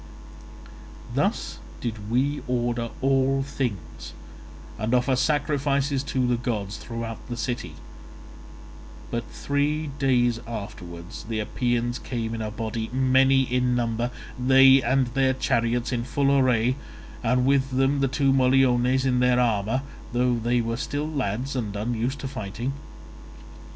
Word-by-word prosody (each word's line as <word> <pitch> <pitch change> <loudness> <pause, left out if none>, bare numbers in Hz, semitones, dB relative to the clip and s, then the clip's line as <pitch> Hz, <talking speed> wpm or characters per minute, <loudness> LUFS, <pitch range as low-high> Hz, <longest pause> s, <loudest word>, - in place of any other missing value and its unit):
"Thus - - -1 0.2
did 110 -3 -5
we 135 +5 +1
order 120 -1 -1
all 135 0 +2
things, 125 - -5 0.7
and 115 +4 +1
offer 125 +1 +2
sacrifices 140 -1 +1
to 130 -3 0
the 125 -1 +1
gods 110 -3 -3
throughout 115 -1 -6
the 120 - -4
city; 120 +1 -3 1.4
but 120 0 -1
three 145 +1 -1
days 120 -3 +2
afterwards 90 -5 -7
the 110 0 -3
Epeans 120 +2 -1
came 115 -3 -4
in 115 - -4
a 110 - -2
body, 110 0 -4
many 130 +1 +4
in 125 0 +1
number, 120 0 0 0.3
they 135 +1 +7
and 130 +1 +2
their 130 -1 +3
chariots, 120 -1 0
in 120 -2 -1
full 140 +2 +1
array, 125 -1 +3 0.5
and 125 +2 +2
with 135 0 +3
them 135 +2 +2
the 135 - +2
two 135 +1 +2
Moliones 130 -1 +3
in 125 -1 +2
their 125 0 +3
armour, 115 +1 +1 0.3
though 125 0 +2
they 120 +1 +1
were 115 0 -2
still 145 +3 -3
lads 135 -3 -2
and 110 -5 -3
unused 120 +5 -2
to 135 - -3
fighting. 120 0 -4
125 Hz, 135 wpm, -25 LUFS, 115-135 Hz, 1.4 s, they